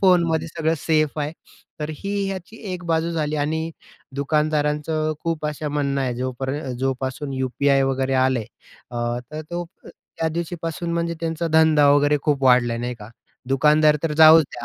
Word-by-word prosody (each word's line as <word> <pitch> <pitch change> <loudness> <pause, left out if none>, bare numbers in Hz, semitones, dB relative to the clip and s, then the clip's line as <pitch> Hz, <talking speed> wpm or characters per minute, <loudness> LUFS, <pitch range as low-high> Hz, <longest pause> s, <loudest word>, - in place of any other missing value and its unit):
फोनमध्ये 170 -4 +3
सगळं 160 0 -1
सेफ 155 0 +1
आहे. 150 +1 -2 0.5
तर 150 +1 -3
ही 200 +1 -4 0.2
याची 190 +3 -7 0.2
एक 180 -1 -6
बाजू 165 0 0
झाली 155 -2 -1
आणि 160 +2 -1 0.5
दुकानदारांचं 150 +1 0
खूप 165 -2 -1
असं 150 0 -3
म्हणणं 140 -2 0
आहे 130 -2 -1
जोपर 130 +1 -3 0.3
जोपासून 135 +2 -2
यू-पी-आय 135 +1 +1
वगैरे 135 0 0
आलंय. 130 -4 +1 0.5
अ, 120 0 -2
तर 155 - -5
तो 175 0 -3 0.2
त्या 165 - -5
दिवशीपासून 170 0 -4
म्हणजे 170 0 -1
त्यांचा 165 0 -2
धंदा 160 -2 +5
वगैरे 145 +1 +4
खूप 145 -3 0
वाढला. 125 -2 +4
नाही 120 +1 -3
का? 105 -2 -12 0.4
दुकानदार 150 +2 +4
तर 165 -2 0
जाऊच 160 0 +9
द्या 120 - -7
150 Hz, 155 wpm, -22 LUFS, 135-160 Hz, 0.5 s, जाऊच